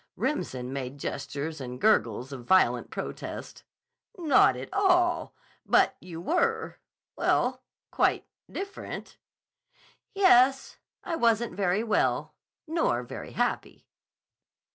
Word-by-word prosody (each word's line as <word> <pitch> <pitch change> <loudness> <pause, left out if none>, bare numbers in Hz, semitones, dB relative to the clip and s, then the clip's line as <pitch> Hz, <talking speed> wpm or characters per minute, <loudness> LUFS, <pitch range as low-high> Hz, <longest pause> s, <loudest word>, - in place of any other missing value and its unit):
Remsen 130 - -3
made 135 0 -5
gestures 145 +2 -5
and 125 -1 -6
gurgles 145 - +2
of 130 -3 -8
violent 190 +5 +3
protest. - - -7 0.5
"Not 310 -7 +4
at - - -8
all! 360 -3 +2 0.3
But - - +3
you 170 -3 -8
were—well, 450 - -1 0.3
quite - - +1 0.3
different." 395 0 -7 1.0
"Yes, 270 -9 +4 0.3
I 340 - -2
wasn't 235 -4 +2
very 195 +2 0
well. 220 - 0 0.3
Nor 330 0 0
very - - -8
happy." - - -2
230 Hz, 100 wpm, -28 LUFS, -, 1.0 s, Not